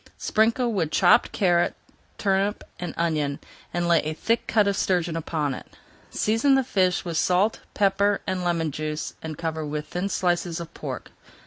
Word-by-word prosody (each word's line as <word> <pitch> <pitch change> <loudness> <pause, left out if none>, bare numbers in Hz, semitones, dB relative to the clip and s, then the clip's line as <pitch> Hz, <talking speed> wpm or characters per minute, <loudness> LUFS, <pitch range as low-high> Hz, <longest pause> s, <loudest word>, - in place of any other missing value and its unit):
Sprinkle 230 +2 +1
with 170 -7 0
chopped 175 +2 +4
carrot, 175 -3 +2 0.4
turnip, 195 +1 0 0.2
and 175 - -5
onion, 150 -4 0 0.3
and 175 0 -1
lay 170 -1 +5
a 155 +1 -3
thick 230 +8 0
cut 210 -2 +3
of 200 - +1
sturgeon 175 -4 0
upon 155 -3 -1
it. - - -11 0.3
Season 225 +6 +2
the 265 - +3
fish 185 -8 +1
with 170 -2 -2
salt, 185 +6 +2 0.2
pepper, 200 0 +2
and 185 -1 -2
lemon 165 -3 0
juice, 155 +1 -4
and 155 -2 -6
cover 160 -1 -3
with 150 0 -4
thin 180 +3 -2
slices 175 -2 0
of 170 -1 -8
pork. - - -6
175 Hz, 165 wpm, -25 LUFS, 160-200 Hz, 0.4 s, lay